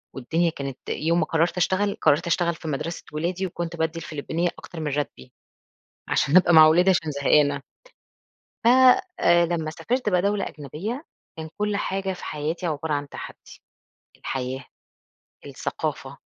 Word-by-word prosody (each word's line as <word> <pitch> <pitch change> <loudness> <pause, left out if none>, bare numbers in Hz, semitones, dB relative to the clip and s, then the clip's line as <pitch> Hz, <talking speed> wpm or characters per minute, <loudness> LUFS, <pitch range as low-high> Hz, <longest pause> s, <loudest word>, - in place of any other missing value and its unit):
والدنيا 165 +7 0
كانت 140 -4 -6
يوم 165 +2 +1
ما 160 - +2
قرّرت 165 +3 0
أشتغل، 200 +3 +1
قرّرت 155 +2 +3
أشتغل 170 0 +1
في 165 - -9
مَدرسة 155 +3 -4
ولادي 175 +5 -2
وكنت 170 -1 -5
بادّي 160 0 -2
الفلبينيّة 165 +2 -2
أكتر 170 - -10
من 155 -2 -2
راتبي، 135 - -4 0.8
عشان 155 +6 +3
أبقى 175 -2 +5
مع 155 -1 +10
أولادي 175 +4 +5
عشان 165 -4 +1
زهقانة. 140 0 +2 1.0
ف - - +6 0.5
آآ 175 0 +5
لمّا 165 -2 -2
سافرت 245 +9 -2
بقى 180 -3 +2
دولة 200 0 0
أجنبية 185 - -6 0.3
كان 160 0 -5
كل 210 -1 0
حاجة 195 -1 -2
في 180 - -9
حياتي 155 +4 -3
عبارة 155 -1 -2
عن 145 0 -3
تحدّي، - - -11 0.6
الحياة، 130 0 -4 0.8
الثقافة، - - -4
165 Hz, 145 wpm, -24 LUFS, 150-180 Hz, 1.0 s, مع